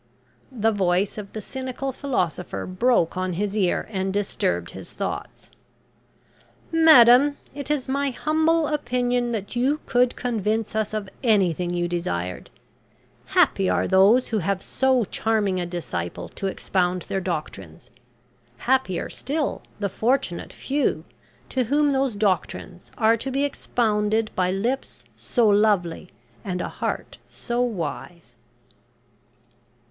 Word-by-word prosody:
The 225 -3 +1
voice 190 0 0
of 200 -1 -8
the 215 - -5
cynical 260 +3 -4
philosopher 185 - -2
broke 185 -1 +1
on 185 0 -2
his 200 +3 -2
ear 190 -4 +1
and 190 -2 -1
disturbed 205 0 -1
his - - -9
thoughts. - - -5 1.2
"Madame, 285 -3 +7 0.2
it 285 0 -6
is 295 -3 0
my 280 +1 0
humble 315 +4 +1
opinion 245 -4 0
that 210 -1 -4
you 270 +5 +1
could 245 0 +2
convince 220 -2 -1
us 215 0 -1
of 210 -2 -3
anything 185 - +2
you 175 0 0
desired. 90 - -3 0.8
Happy 190 -1 +3
are - - +1
those 200 +7 +5
who 220 - 0
have 195 +1 -1
so 260 -2 +2
charming 205 -3 0
a 175 - -2
disciple 90 - -4
to 195 - -4
expound 180 -1 -1
their 195 - -3
doctrines, 150 - -6 0.7
happier 250 - 0
still 290 +2 -3 0.2
the 205 - 0
fortunate 225 -3 -1
few 285 +2 -1 0.5
to 255 -2 0
whom 290 +4 +2
those 270 -4 0
doctrines 190 -2 -2
are 225 0 +4
to 265 +4 -4
be 270 +2 0
expounded 220 -5 0
by 180 -1 +1
lips 230 +8 -2
so 240 -3 +1
lovely 200 -4 +2 0.3
and 180 -2 -3
a - - -3
heart - - -4
so 240 0 -3
wise." 170 - -4
215 Hz, 130 wpm, -24 LUFS, 185-255 Hz, 1.2 s, Madame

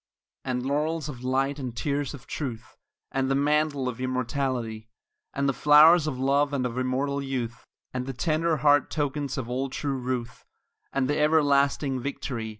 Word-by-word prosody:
VII - - -5
And 125 0 -1
laurels 150 +2 -1
of 125 -4 -8
light, 135 +3 0
and 125 -3 -5
tears 145 0 -1
of 125 -3 -14
truth, 120 -6 -6 0.4
And 135 0 0
the 135 - +2
mantle 145 -1 +1
of 125 0 -4
immortality; 125 -3 -2 0.4
And 140 0 -1
the 135 - +2
flowers 150 +5 +6
of 135 -4 -2
love 140 +2 +2
and 130 -3 0
of 125 +1 -2
immortal 135 +2 -1
youth, 125 -3 -4 0.3
And 125 0 -3
the 135 - -3
tender 160 +4 +1
heart 145 0 +4
tokens 145 -2 -2
of 130 -3 -3
all 130 +2 -2
true 135 0 -3
ruth 125 -1 -4 0.5
And 135 -1 0
the 145 +2 0
everlasting 145 -3 +3
victory! 125 -3 -4
135 Hz, 170 wpm, -26 LUFS, 125-145 Hz, 0.5 s, flowers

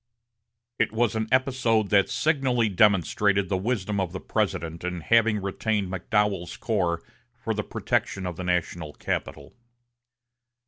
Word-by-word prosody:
It - - +2
was 115 0 +1
an 110 0 -1
episode 125 -5 +2
that 100 -2 +4
signally 130 -7 +1
demonstrated 100 0 +3
the 95 - +1
wisdom 105 -1 -1
of 90 -2 -2
the 95 - -4
President 85 0 -2
in 90 -1 -3
having 115 +3 +3
retained 100 0 -1
McDowell's 95 -1 -1
corps 90 -7 -1 0.3
for - - -3
the - - -1
protection 95 -1 -2
of 90 -1 -4
the 95 - -6
national 85 -3 -2
capital. - - -4
100 Hz, 135 wpm, -26 LUFS, 90-110 Hz, 0.3 s, that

